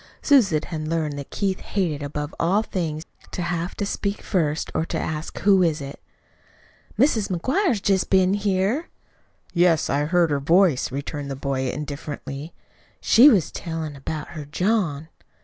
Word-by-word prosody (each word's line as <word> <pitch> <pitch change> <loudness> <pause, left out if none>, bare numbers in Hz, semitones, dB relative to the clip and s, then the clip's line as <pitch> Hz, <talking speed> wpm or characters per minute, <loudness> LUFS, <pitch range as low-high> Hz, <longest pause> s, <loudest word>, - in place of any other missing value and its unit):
Susan 210 - +4
had 155 -2 -5
learned 155 -2 -1
that 140 - -8
Keith 195 -2 -1
hated 170 -7 -2
above 145 +1 -4
all 195 +6 +2
things 160 -7 -3 0.3
to 180 - -4
have 175 +1 -2
to 205 - -2
speak 200 +1 -3
first, 155 -5 -1
or - - 0
to 165 - -3
ask, 155 0 -4
"Who 195 -2 +5
is 165 -3 +2
it?" 140 0 -8 1.0
"Mis' 225 -8 +3
McGuire's 255 - +1
jest 190 -2 +1
been 190 0 +4
here." 205 - 0 0.6
"Yes, 175 -3 +3
I 145 +2 +1
heard 170 0 +2
her 145 - +1
voice," 165 -1 +3
returned 140 +1 -5
the 135 - -3
boy 135 -1 -2
indifferently. 145 +1 -6 0.5
"She 255 +6 +7
was 200 - +2
tellin' 160 -3 -5
about 150 +2 -5
her 155 -3 -7
John." 160 -2 0
165 Hz, 155 wpm, -23 LUFS, 150-195 Hz, 1.0 s, She